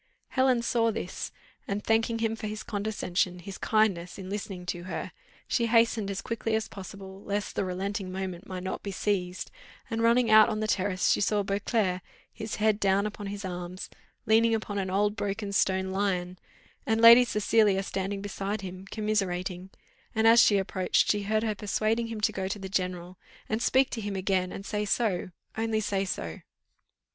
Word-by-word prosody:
Helen 260 -3 +2
saw 230 -1 +2
this, 225 - -5 0.4
and, 200 +1 -2
thanking 225 +1 +2
him 225 -1 0
for 220 - -5
his 215 0 -5
condescension, 200 -4 -1
his 190 +2 -9
kindness, 195 -6 +1
in 190 -1 -7
listening 200 -3 -5
to 175 0 -4
her, 185 - -4 0.4
she 235 -2 +1
hastened 230 -2 +3
as 195 -1 -4
quickly 230 -2 -1
as 220 0 -1
possible, 195 0 -9
lest 205 +1 -3
the - - 0
relenting 190 +1 -3
moment 190 0 -5
might 185 -1 -5
not 185 - -4
be 200 - -5
seized; 185 -1 -2 0.4
and 225 0 -1
running 230 0 +4
out 215 +1 +8
on 215 -1 -2
the 215 - -1
terrace, 190 -2 +1
she - - +2
saw 205 0 +2
Beauclerc, 195 -1 0 0.3
his 215 0 -5
head 215 -1 +2
down 200 0 +2
upon 210 -1 -5
his 200 0 -5
arms, 180 0 -6 0.3
leaning 225 +1 +4
upon 205 -2 -3
an 190 -1 -2
old 205 +2 +1
broken 205 0 -3
stone 190 -1 +1
lion, 185 -2 -1 0.4
and 225 0 +1
Lady 230 +2 +10
Cecilia 210 -3 +2
standing 195 +1 -3
beside 200 +1 -3
him, 185 0 -8
commiserating; 190 -4 -2 0.5
and 220 0 +2
as 230 +1 +8
she 205 - +5
approached, 190 -1 +1
she 210 - 0
heard 215 +2 0
her 220 -2 0
persuading 215 +3 0
him 225 -2 -5
to 215 - +2
go 190 -2 -3
to 195 - -3
the 195 -1 -6
general, 180 -1 -3 0.3
and 220 +2 -1
speak 265 +2 +3
to 225 - -3
him 205 -1 -3
again, 185 -1 0
and 195 - -7
say 210 +1 -2
so 205 -4 0 0.3
only 225 0 0
say 195 -2 -1
so. 85 - -4
205 Hz, 185 wpm, -28 LUFS, 190-220 Hz, 0.5 s, Lady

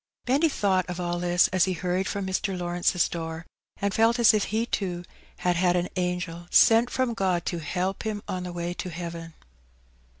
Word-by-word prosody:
Benny 285 +6 +3
thought 190 - +1
of 180 0 -4
all 175 0 -2
this, 175 0 +3
as 185 -1 +3
he 190 - -1
hurried 180 +2 -1
from 200 -1 -3
Mr. 190 0 -2
Law 175 -1 -3
rence's 175 0 +2
door, 165 0 -5 0.3
and 200 -1 -1
felt 225 +3 +3
as 235 -2 +6
if 210 -2 +1
he, 220 +2 -1
too, 180 -6 -3 0.3
had 180 -1 0
had 180 0 +3
an 175 0 0
angel 180 -1 -3
sent 230 +2 +5
from 255 -1 0
Ood 185 -6 0
to 175 - -2
help 185 +4 -2
him 215 -2 -4
on 185 - -3
the 180 0 -5
way 175 0 -3
to 180 - -5
heaven. 170 -1 -7
180 Hz, 200 wpm, -26 LUFS, 175-200 Hz, 0.3 s, as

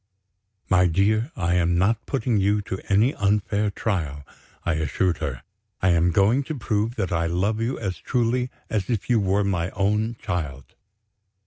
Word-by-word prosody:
"My 90 -1 +4
dear, 105 - +1
I 85 0 0
am 85 -1 +2
not 105 +5 +1
putting 120 -4 0
you 100 +1 +2
to 95 -1 -5
any 110 +7 +4
unfair 105 +1 +1
trial," 80 -9 -3 0.4
I 85 - +1
assured 80 +3 0
her; 70 -6 -4 0.4
"I 95 - +2
am 85 0 +3
going 100 - +3
to 155 -1 -4
prove 110 0 -1
that 95 -4 -2
I 85 -1 +1
love 100 +6 0
you 120 +3 -1
as 95 -7 -4
truly 125 0 0 0.2
as 105 -4 -2
if 115 0 -1
you 115 - +4
were 100 +1 +1
my 90 -3 0
own 105 +4 +1
child." 70 -7 -4
100 Hz, 170 wpm, -24 LUFS, 85-110 Hz, 0.4 s, My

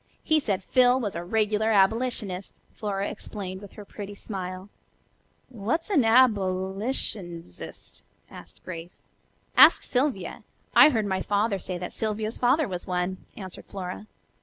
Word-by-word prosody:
He 315 -1 +3
said 200 -9 -1
Phil 250 +3 +4
was 210 -6 -2
a 170 - -4
regular 215 +3 +1
abolitionist," 210 -2 +1 0.2
Flora 200 -1 -2
explained 190 -3 -6
with 205 - -12
her 210 - -10
pretty 205 0 -8
smile. 185 -2 -6 0.8
"What's 255 - -2
an 320 -9 +5
abbylitionzist?" 195 - 0 0.3
asked - - -13
Grace. 170 -1 -9 0.4
"Ask - - +8
Sylvia. 250 -8 -1 0.3
I 305 - +9
heard 225 -7 0
my 190 -1 -1
father 205 0 +1
say 180 0 -4
that 180 0 -6
Sylvia's 215 0 -2
father 265 +4 +3
was 180 -1 -5
one," 180 0 -1 0.2
answered 190 -3 -8
Flora. 190 +2 -6
205 Hz, 135 wpm, -26 LUFS, 185-225 Hz, 0.8 s, I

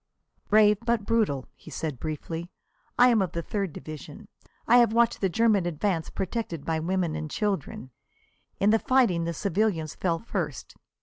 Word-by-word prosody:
"Brave 210 -1 +5
but 235 -3 0
brutal," 210 - +1
he - - -15
said 150 -3 -4
briefly. 160 +2 -5 0.5
"I 250 +1 +7
am 230 -4 +3
of 180 -3 -2
the 170 - -3
Third 195 -2 -2
Division. 155 0 -10 0.4
I 245 - +6
have 235 -2 +5
watched 235 0 +2
the 190 - +2
German 205 -1 +2
advance 170 0 -1
protected 190 -6 -4
by 160 -1 0
women 175 0 -1
and 155 -1 -4
children. 190 - -3 0.7
In 205 +2 +4
the 225 - +4
fighting 225 -12 +2
the 170 - -2
civilians 190 -5 0
fell 170 -3 -1
first. 165 - -5
185 Hz, 165 wpm, -27 LUFS, 160-215 Hz, 0.7 s, I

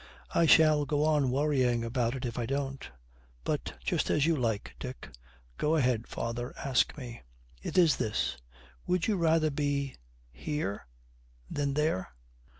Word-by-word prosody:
'I 165 - +4
shall 155 -2 +6
go 145 +1 +1
on 150 -4 +3
worrying 130 -3 +2
about 120 +1 0
it 130 - -4
if 120 0 -3
I 115 - -2
don't 135 0 -3 0.5
but - - -2
just - - 0
as 150 - +3
you 165 0 +3
like, 115 -6 -1
Dick.' 130 - -7 0.5
'Go 155 +2 +2
ahead, 125 -6 +1
father; 120 +2 -4
ask 135 +1 +1
me.' 120 -4 -8 0.4
'It - - -4
is 170 -5 +5
this. 110 - -1 0.5
Would 180 -1 +1
you 215 - +1
rather 160 -3 +3
be 140 -1 -1 0.3
here 125 - -4 0.6
than 140 -1 -1
there?' 150 -11 +1
140 Hz, 150 wpm, -30 LUFS, 120-150 Hz, 0.6 s, shall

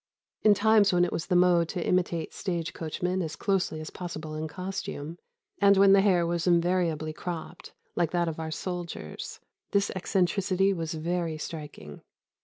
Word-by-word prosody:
In 210 -1 +6
times 210 0 +4
when 175 -1 +4
it 175 - -3
was 165 - -3
the 180 - +1
mode 175 -2 +4
to 175 - -3
imitate 175 -3 0
stage 170 -3 -3
coachmen 180 +3 -2
as 160 -3 -4
closely 190 -5 0
as 155 - -7
possible 160 -3 -6
in 155 +1 -3
costume, 175 -2 -5 0.4
and 200 -1 +6
when 195 0 +7
the 195 - +6
hair 185 -4 +3
was 170 +1 -1
invariably 170 -3 +1
cropped, 175 +1 -7 0.2
like 170 -3 +1
that 175 0 0
of 160 -1 -4
our 160 0 -3
soldiers, 175 +1 -5 0.3
this 200 0 +2
eccentricity 190 +1 +1
was 165 -3 -3
very 165 0 -2
striking. 150 - -8
175 Hz, 165 wpm, -28 LUFS, 160-185 Hz, 0.4 s, when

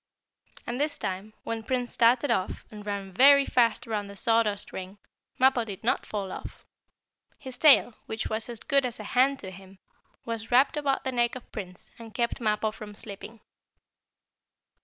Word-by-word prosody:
And 245 +3 -3
this 295 0 -1
time, 195 +3 -5
when 230 0 -3
Prince 245 +1 -2
started 245 +4 +3
off, 185 - -1
and 210 -1 -9
ran 200 -1 -4
very 280 +6 +7
fast 235 -1 +2
around 210 -3 -3
the 200 - -10
sawdust 215 -1 +1
ring, 190 +2 -7 0.4
Mappo 260 -2 +4
did 205 -2 -8
not 235 - 0
fall 200 -3 -4
off. - - -9 0.7
His 260 -1 -9
tail, 280 -5 +6
which 220 - -4
was 220 +2 -2
as 235 -2 -5
good 280 -3 +2
as 245 -3 -4
a - - -6
hand 265 +5 +2
to 190 - -7
him, 190 +1 -14 0.5
was 230 -1 -5
wrapped 260 +5 +4
about 285 -2 0
the 260 - -2
neck 240 -1 +1
of 255 - -11
Prince, 180 -4 -7
and 225 -2 -11
kept 235 0 -1
Mappo 215 -1 +1
from 210 -1 -10
slipping. 215 +2 -9
225 Hz, 175 wpm, -27 LUFS, 205-250 Hz, 0.7 s, very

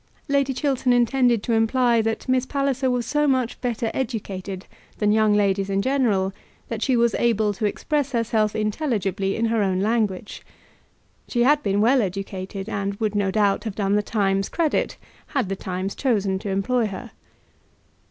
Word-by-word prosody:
Lady 280 -2 +2
Chiltern 265 -2 0
intended 245 -2 +3
to 235 - 0
imply 230 +1 +3
that 225 +3 -2
Miss 255 -1 +2
Palliser 275 -2 0
was 245 -2 0
so 295 +4 +1
much 255 -3 0
better 235 -2 -1
educated 195 -6 -4 0.3
than 210 -1 +2
young 215 -1 +3
ladies 200 -1 +1
in 195 0 +1
general 210 -6 +1 0.4
that 225 -2 -4
she 260 -1 +2
was 235 -2 +3
able 220 -3 +2
to 210 +2 -1
express 285 +5 -1
herself 225 -3 0
intelligibly 210 -4 -1
in 230 - 0
her 225 -1 +1
own 190 -2 +1
language. 210 -2 -1 0.8
She 240 -1 +1
had 295 +3 +4
been 200 -3 +1
well 250 +4 +4
educated, 195 0 -4
and 200 0 -2
would, 210 0 -1
no 200 -2 +1
doubt, 200 0 +1
have 215 -3 -4
done 200 -1 0
the 210 - +3
Times 195 -2 0
credit 325 -3 0 0.3
had 265 -10 -1
the 195 - -1
Times 185 +1 -4
chosen 205 -7 0
to 200 - -5
employ 215 +5 +1
her. 195 - -8
220 Hz, 170 wpm, -23 LUFS, 195-250 Hz, 0.8 s, had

